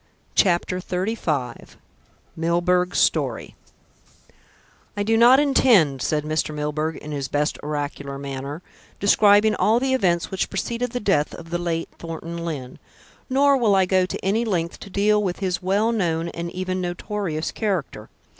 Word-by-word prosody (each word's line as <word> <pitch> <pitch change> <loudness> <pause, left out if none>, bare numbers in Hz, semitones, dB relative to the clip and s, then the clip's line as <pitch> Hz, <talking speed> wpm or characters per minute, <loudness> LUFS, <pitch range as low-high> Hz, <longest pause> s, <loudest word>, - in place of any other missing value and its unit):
CHAPTER 180 -1 +2
XXXV 180 - -3 0.6
MILBURGH'S 175 +2 +1
STORY - - 0 1.4
"I 205 - 0
do 225 +2 +2
not 240 +4 +7
intend," 225 - +4
said 150 -1 0
Mr. 155 0 -2
Milburgh 150 +1 -2
in 150 - -9
his 140 -2 -3
best 145 +2 -1
oracular 145 -2 -4
manner, 140 +3 -6 0.4
"describing 205 +1 +5
all 220 +2 +2
the 260 +1 0
events 175 -9 +1
which 190 - -1
preceded 235 +5 -2
the 245 - -1
death 190 -9 +1
of 165 0 -11
the 175 - -1
late 165 -1 -2
Thornton 165 0 -6
Lyne. 140 -7 -6 0.5
Nor 275 +1 +4
will 220 -6 +3
I 190 -1 +4
go 185 0 +2
to - - -6
any 215 +4 +1
length 175 -7 -2
to - - -10
deal 210 +2 +2
with 185 -3 -2
his 185 -3 -2
well 200 +5 +1
known 170 -6 -1
and 170 0 -5
even 185 0 -3
notorious 175 -2 -3
character. 175 - -3
180 Hz, 150 wpm, -23 LUFS, 155-205 Hz, 1.4 s, not